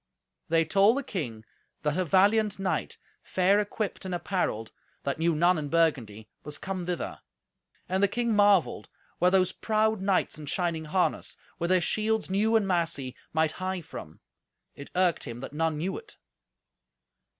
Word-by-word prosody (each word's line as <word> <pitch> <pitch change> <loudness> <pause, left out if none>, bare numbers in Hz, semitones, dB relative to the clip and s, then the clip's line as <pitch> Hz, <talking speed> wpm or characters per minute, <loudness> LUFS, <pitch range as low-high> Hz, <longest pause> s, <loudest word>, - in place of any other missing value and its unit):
They 165 0 +3
told 200 - +4
the 280 - -1
king 120 - -5 0.4
that 150 -1 +1
a 185 - +1
valiant 205 +4 +3
knight, 195 -1 -2 0.2
fair 190 +2 +2
equipped 210 0 -3
and 185 -1 -3
apparelled, 175 - -2 0.3
that 140 +2 -2
knew 165 0 +2
none 175 +2 +3
in 145 -1 -4
Burgundy, 125 -11 +1 0.2
was 150 0 -6
come 185 -2 -4
thither. 180 -2 -3 0.7
And 190 +1 0
the 200 - +5
king 235 +2 0
marvelled 205 -4 +3 0.3
where 180 - +5
those 185 -1 +3
proud 220 -1 0
knights 190 -5 0
in 150 - -8
shining 170 -1 -1
harness, 180 +4 -1 0.2
with 170 - -1
their 185 -1 +4
shields 215 +3 0
new 215 +4 +2
and 215 -3 +3
massy, 165 -8 -1 0.2
might 160 -1 +2
hie 185 +1 -3
from. 75 - -10 0.5
It 140 - -10
irked 180 -2 +2
him 120 -3 -6
that 135 - -7
none 160 0 0
knew 180 +5 -2
it. 445 -2 -17
180 Hz, 160 wpm, -28 LUFS, 155-200 Hz, 0.7 s, the